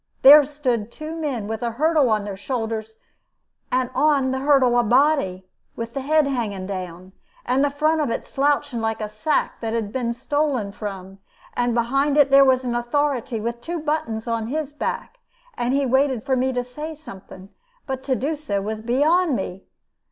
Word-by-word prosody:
There 290 +2 +10
stood 250 -7 -2
two 310 +4 -7
men, 285 -9 -3
with 220 0 -4
a 235 -1 -2
hurdle 305 0 +2
on 215 -2 +1
their 200 -1 -5
shoulders, 220 0 -4 0.7
and 255 0 0
on 275 -1 +2
the 265 - -1
hurdle 265 -3 +4
a - - +3
body, 240 -6 +2 0.3
with 230 0 -6
the 275 - -3
head 305 +2 +3
hanging 220 -8 -2
down, 185 -1 -7 0.3
and 265 +2 +2
the 285 - +3
front 310 +3 +1
of 290 - 0
it - - -3
slouching, 285 -3 0
like 225 0 -1
a 215 - -3
sack 215 +9 -1
that 225 -1 -3
has 225 -3 -1
been 235 +1 -2
stolen 265 -5 -1
from; 195 -2 -7 0.3
and 245 -1 0
behind 275 +5 +1
it 280 -2 +5
there 275 0 +8
was 260 -1 +3
an 245 -1 -2
authority 240 -1 -1
with 235 +2 -4
two 340 +6 -4
buttons 295 -8 -2
on 230 -1 -1
his 295 +2 -3
back, - - -4 0.4
and 240 +1 -1
he 280 +1 +1
waited 265 -2 +1
for 265 - +1
me 260 +1 +1
to 250 -1 -1
say 300 +6 -7
something; 195 -9 -12 0.4
but 265 -2 -4
to 265 - +1
do 290 +6 -1
so 285 -10 -3
was 215 +2 -4
beyond 295 +7 +2
me. 190 -2 -5
255 Hz, 190 wpm, -22 LUFS, 225-290 Hz, 0.7 s, There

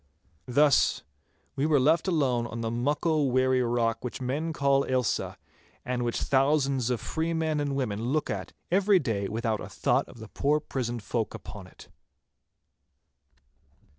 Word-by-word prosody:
Thus 140 +2 +3 0.5
were 140 +3 +1
we 155 -2 +4
left 155 +8 +3
alone 130 -9 +1
on 115 0 -6
the 115 -1 -2
muckle 145 +4 +1
weary 130 0 +2
rock 120 -1 0
which 125 - -5
men 140 +6 -2
call 140 -2 +2
Ailsa, 130 -3 -1 0.5
and 125 0 -2
which 120 -1 -1
thousands 135 -2 +2
of 125 -2 0
free 165 +1 -2
men 160 -2 0
and 145 -1 -1
women 115 -5 -2
look 150 +5 0
at - - -4 0.2
every 195 +2 +4
day 110 - -1
without 110 0 -2
a - - -7
thought - - 0
of - - -13
the 110 -1 -9
poor 150 +2 +1
prisoned 120 -6 -4
folk 110 -2 -2
upon 100 -3 -9
it. - - -16
130 Hz, 155 wpm, -28 LUFS, 120-150 Hz, 0.5 s, we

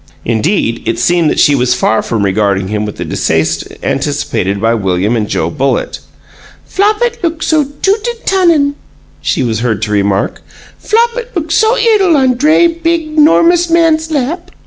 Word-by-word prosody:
Indeed, 115 - 0
it - - -1
seemed 175 -3 +2
that - - -1
she 145 - +4
was 125 -2 +1
far 110 -3 +1
from 110 -3 -2
regarding 100 -1 0
him 105 0 -2
with 105 - -7
the - - -5
distaste 80 0 -1 0.2
anticipated 135 -8 -2
by 115 +2 +1
William 100 0 0
and 110 -2 -1
Joe - - -1
Bullitt. 135 -2 -2 0.7
"Flopit 430 +4 0
look 330 -3 -2
so 310 -2 +2 0.2
toot 415 +3 +1
an' 475 -1 -6
tunnin'," 335 -7 +2 0.5
she 105 - -1
was 115 -3 -1
heard 115 -3 -1
to 105 - -3
remark. 100 -1 -1 0.4
"Flopit 470 +2 -1
look 325 -2 -3
so 440 +8 +2
'ittle 415 -8 +3
on 260 -2 +2
dray, 300 +7 +3
big, 330 -2 -1
'normous 335 +3 +4
man's 325 -1 +2
lap." 315 +4 -3
260 Hz, 165 wpm, -12 LUFS, -, 0.7 s, she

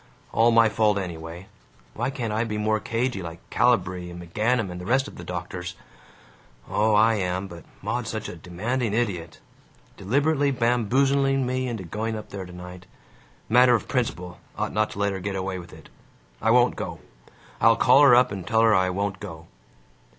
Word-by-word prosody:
All 115 +1 +4
my 115 -1 +5
fault, 105 -1 +2
anyway. 85 -1 -6 0.5
Why 120 +3 -2
can't 120 -5 -3
I 110 +2 +1
be 105 -2 -3
more 110 0 +1
cagey, 115 -1 -2
like 85 -1 -9
Calibree 95 -7 +1
and 85 0 -9
McGanum 105 +4 -1
and 90 0 -7
the - - -8
rest 135 +4 +2
of - - -11
the 85 - -9
doctors? 90 +1 -6 0.9
Oh, 110 0 +2
I 110 +2 +5
am, 95 0 -2
but 85 -2 -11 0.2
Maud's - - -2
such - - -4
a - - -7
demanding 110 +5 -2
idiot. 90 -8 -2 0.6
Deliberately 140 +7 +1
bamboozling 135 +3 +2
me 130 +1 -1
into 115 -5 -4
going 110 +6 -3
up 110 - -8
there 95 -2 -6
tonight. 90 +1 -10 0.6
Matter 125 +2 +6
of 115 - -3
principle: 90 - -2 0.2
ought - - -2
not 110 0 +1
to - - -10
let 100 0 +1
her 95 - -4
get 100 +1 -4
away 95 0 -3
with 85 0 -11
it. - - -14 0.5
I 110 - +1
won't 120 +1 +4
go. - - -5 0.6
I'll 115 - +6
call 130 +4 +5
her 140 -4 +8
up 125 +1 +4
and 95 -3 -6
tell 110 0 +3
her 115 -1 +5
I 95 -2 +3
won't 100 +1 -2
go. 80 -6 -9
105 Hz, 185 wpm, -25 LUFS, 90-120 Hz, 0.9 s, her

